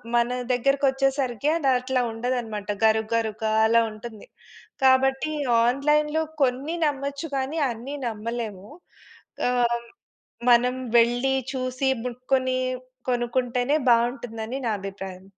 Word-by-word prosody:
మన 235 0 +3 0.3
దగ్గరకొచ్చేసరికి 270 -1 +1
అది 300 -5 -1
అట్లా 255 0 0
ఉండదన్నమాట. 225 -3 -3 0.2
గరుక్, 220 0 +3
గరుగ్గ 220 -1 -2 0.2
అలా 230 +1 +5
ఉంటుంది. 215 0 -10 0.6
కాబట్టి, 265 +3 +3 0.3
ఆన్‌లైన్‌లో 300 +5 +2 0.2
కొన్ని 270 +6 0
నమ్మొచ్చు 280 +1 -2
కానీ, 270 +4 -2
అన్ని 240 +5 -6
నమ్మలేము. 220 -3 -5 0.8
ఆహ్, 235 -1 +1 0.7
మనం 245 +1 +5 0.2
వెళ్ళి, 245 +3 +3 0.2
చూసి, 255 +1 -1 0.2
ముట్టుకొని 255 +1 0 0.5
కొనుకుంటేనే 245 +2 0
బావుంటుందని 235 0 0
నా 225 - +1
అభిప్రాయం. 195 -1 -7
245 Hz, 100 wpm, -25 LUFS, 230-270 Hz, 0.8 s, అలా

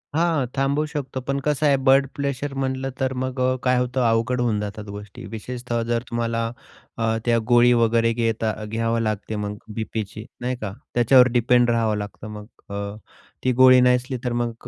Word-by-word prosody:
हां, 160 -4 +2
थांबवू 140 +3 +1
शकतो 145 -3 -5
पण 140 0 0
कसं 150 0 +1
आहे 140 -2 +4
ब्लड 135 0 +5
प्लेशर 140 0 -3
म्हटलं 135 0 -2
तर 130 -1 0
मग 130 0 -3
अ, 130 0 +2
काय 125 -1 +3
होतं 125 +1 0
अवघड 115 +2 +1
होऊन 115 -4 +1
जातात 105 0 -5
गोष्टी 105 0 -9
विशेषतः 120 +2 -4
जर 115 0 0
तुम्हाला 115 -1 -1 0.5
अ, 115 0 0
त्या 120 -1 +3
गोळी 120 0 +6
वगैरे 115 0 +3
घेता 115 -1 0
घ्यावं 115 +1 -1
लागते 110 0 -2
मग 105 0 -3 0.2
बीपीची 110 -1 -5 0.2
नाही 125 +1 -1
का 100 - -3 0.2
त्याच्यावर 125 +1 +6
डिपेंड 120 0 +3
राहावं 115 -2 +1
लागतं 105 +1 -7
मग 105 -1 -8 0.2
अ, 100 0 -4 0.5
ती 130 - +2
गोळी 130 0 +7
नाही 125 0 +5
असली 125 +1 -3
तर 125 -2 -1
मग 120 -1 -2
120 Hz, 180 wpm, -23 LUFS, 110-130 Hz, 0.5 s, गोळी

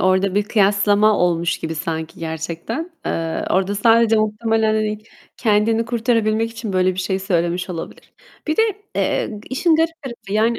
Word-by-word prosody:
orada 190 +1 +2
bir 205 - +3
kıyaslama 205 0 +3
olmuş 170 -1 +1
gibi 160 0 -4
sanki 160 0 -4
gerçekten. 165 - -4 0.2
Eee, 165 -1 -2
orada 195 +2 +1
sadece 225 +1 +4
muhtemelen, 215 +1 +1
hani, 215 -1 -1 0.4
kendini 225 0 +2
kurtarabilmek 225 -1 0
için 225 -3 -6
böyle 185 0 +2
bir - - -10
şey 190 +1 -1
söylemiş 180 -1 -1
olabilir. 165 -2 -8 0.3
Bir 310 - 0
de, 445 - +5 0.3
eee, 210 -2 -1
işin 320 +4 +2
garip 325 -1 -1
tarafı, 235 -6 -8
yani, 225 +2 +2
210 Hz, 155 wpm, -20 LUFS, 185-230 Hz, 0.4 s, de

